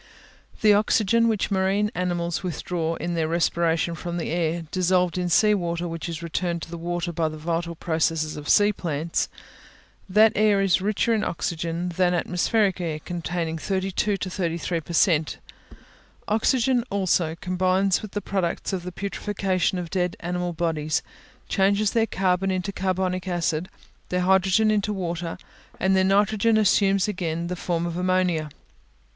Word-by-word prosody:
The 210 -1 +6
oxygen 215 +2 +3
which 215 -2 0
marine 195 +2 +1
animals 175 -1 -1
withdraw 170 -2 -2
in 175 +1 -3
their 165 -2 0
respiration 170 0 +1
from 175 0 -5
the 165 - -3
air, 170 0 -1
dissolved 180 -1 +2
in 180 -1 -1
sea 210 +5 +4
water, 170 -3 -2 0.2
is 170 0 -5
returned 170 0 -2
to 165 - -9
the 170 - -5
water 175 +1 -2
by 160 0 0
the 155 - -8
vital 170 +2 -2
processes 160 -1 -1
of 145 -1 -7
sea 205 0 +5
plants; 165 -2 -2 0.8
that 215 +3 +6
air 210 -1 +3
is 195 -1 +2
richer 215 +3 +1
in 215 -2 +1
oxygen 170 0 -2
than 180 -1 +3
atmospheric 185 +3 +1
air, 160 -3 -2
containing 165 0 -4
32 195 +2 -1
to 190 - -4
33 170 -2 -2
per 165 - -10
cent. 160 -4 +2 0.9
Oxygen, 240 +3 +2
also, 180 -5 +1
combines 185 +1 +1
with 215 -3 -9
the 205 - -2
products 190 -1 -2
of 185 - -1
the 180 +1 -6
putrefaction 195 -1 -1
of 175 -2 -5
dead 180 -2 -1
animal 180 0 -2
bodies, 160 -3 -1 0.4
changes 200 +1 +2
their 225 -1 +2
carbon 190 -1 0
into 185 +1 -1
carbonic 185 -1 -1
acid, 175 -1 -1 0.4
their 180 0 0
hydrogen 190 +3 +3
into 210 0 0
water, 175 -3 -4 0.4
and 190 +1 +2
their 190 - +4
nitrogen 210 +3 +3
assumes 195 -2 +3
again 170 -4 -2
the 180 - -2
form 170 -1 -2
of 170 -1 -3
ammonia. 180 -3 +1
180 Hz, 155 wpm, -24 LUFS, 170-195 Hz, 0.9 s, The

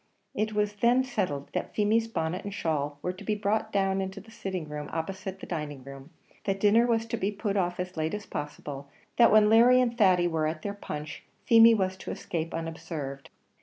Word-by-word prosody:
It 215 +1 -1
was 210 0 0
then 240 +4 +4
settled 180 - -3
that - - -3
Feemy's 220 +2 +2
bonnet 180 -4 -2
and 205 - -5
shawl 150 -6 -2
were 180 - -1
to 190 +3 -11
be 210 +1 0
brought 215 +1 -1
down 195 -1 +1
into 190 +1 -5
the 215 +3 -15
sitting 190 -7 -5
room 150 0 -6
opposite 190 +3 -4
the - - -8
dining 150 -5 -5
room 135 +2 -11 0.4
that 195 -1 -1
dinner 220 +4 +4
was 225 -1 +1
to 230 0 -3
be 200 0 -1
put 205 0 -3
off 180 -2 0
as 180 0 -4
late 160 +3 -1
as 210 - -7
possible 145 -1 -6 0.3
that 235 -1 +6
when 215 -1 +6
Larry 235 +3 +6
and 240 -2 +1
Thady 185 -6 +4
were 160 -2 0
at 155 0 -4
their 200 - -3
punch, 150 -6 -7 0.2
Feemy 230 0 +7
was 190 -2 -1
to - - -8
escape 165 -1 -4
unobserved. 160 -4 -5
190 Hz, 205 wpm, -28 LUFS, 160-215 Hz, 0.4 s, Feemy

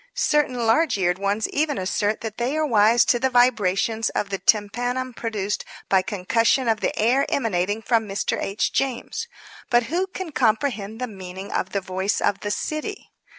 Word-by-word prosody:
Certain 295 -4 +2
large 235 +5 +3
eared 180 -1 +1
ones 200 +2 0
even 295 -1 0
assert 205 +3 -1
that 220 -2 -6
they 255 +6 0
are 310 - +1
wise 225 -2 +4
to 240 - +2
the 265 +2 +1
vibrations 225 -3 +2
of 200 - -1
the 195 - -2
tympanum 245 +6 0
produced 210 -3 -3 0.3
by 190 -1 +4
concussion 225 +7 +1
of 220 -1 +2
the - - -2
air 245 +6 +3
emanating 210 -3 0
from 225 -2 +1
Mr. 195 - -1
H. 200 +2 -1
James. 275 - -2 0.4
But 240 -1 +4
who 370 +2 +1
can 375 -3 -6
comprehend 225 -4 0
the 250 - -1
meaning 190 -3 -8
of 185 - -1
the 200 +1 -2
voice 190 +2 -1
of 195 - 0
the 205 - -4
city? 310 - -4
225 Hz, 175 wpm, -23 LUFS, 200-255 Hz, 0.4 s, wise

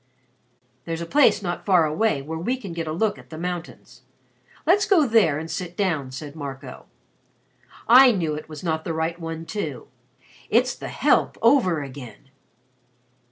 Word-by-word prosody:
"There's 165 0 -4
a - - -3
place 260 - +3
not 175 -1 -3
far 180 -5 +4
away 155 -1 0
where 160 +3 -5
we 245 +10 -1
can 200 -8 -8
get 165 -1 -4
a - - -2
look 205 +6 -1
at - - -16
the 155 - -8
mountains. 170 -8 -6 0.6
Let's 390 +6 +3
go 345 -7 +4
there 220 - +3
and 160 - -5
sit 175 -1 -5
down," 165 -10 -1
said 145 +3 -8
Marco. 140 -4 -8 1.0
"I 255 +2 +8
knew 170 -8 -1
it 150 +1 -7
was 155 +1 -9
not 160 -2 -1
the 165 - -3
right 160 +2 -2
one, 165 0 -6
too. 205 +4 -5 0.6
It's - - +3
the - - -8
Help - - +1
over 185 - +3
again." 135 -1 -11
165 Hz, 165 wpm, -23 LUFS, 155-205 Hz, 1.0 s, I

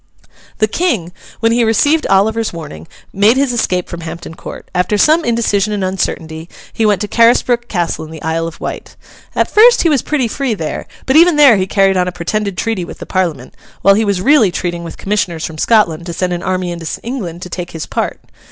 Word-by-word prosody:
The 215 - +3
King, 220 - -1 0.3
when 225 0 +3
he 235 +1 +2
received 285 +8 +2
Oliver's 220 +3 +2
warning, 150 - -9 0.3
made 210 +6 +4
his 270 -2 +1
escape 180 -6 -1
from 170 - -7
Hampton 165 0 -7
Court; - - -10
after 180 +4 +1
some 315 +9 +4
indecision 215 -4 0
and 200 -2 -2
uncertainty, 165 -3 -3 0.2
he 220 - +1
went 205 -2 +2
to 210 - -2
Carisbrooke 235 +1 +3
Castle 170 -4 -2
in - - -12
the 160 -1 -10
Isle 165 0 -1
of 165 - -9
Wight. - - -6 0.4
At - - 0
first, 470 +3 +6
he 335 - +3
was 285 -5 +2
pretty 280 -6 -1
free 255 0 -2
there; 160 -5 -5 0.2
but, 265 +3 +3
even 340 0 +6
there, 285 -6 +7
he 190 -1 0
carried 195 -1 +2
on 180 0 +1
a - - -2
pretended 190 +3 -3
treaty 225 -5 -1
with 170 - -9
the - - -8
Parliament, 165 -9 -2 0.3
while 195 - +6
he 215 +3 +2
was 200 -3 0
really 275 -3 +4
treating 175 -1 -3
with 170 - -8
commissioners 190 -5 -2
from 155 -1 -7
Scotland 175 -7 +2
to 170 - -4
send 180 +1 -1
an 175 - -3
army 185 -1 -2
into 170 -2 -5
England 185 -9 -5
to 180 - -8
take 175 -1 -5
his 165 - -6
part. - - -3
195 Hz, 215 wpm, -15 LUFS, 170-230 Hz, 0.4 s, there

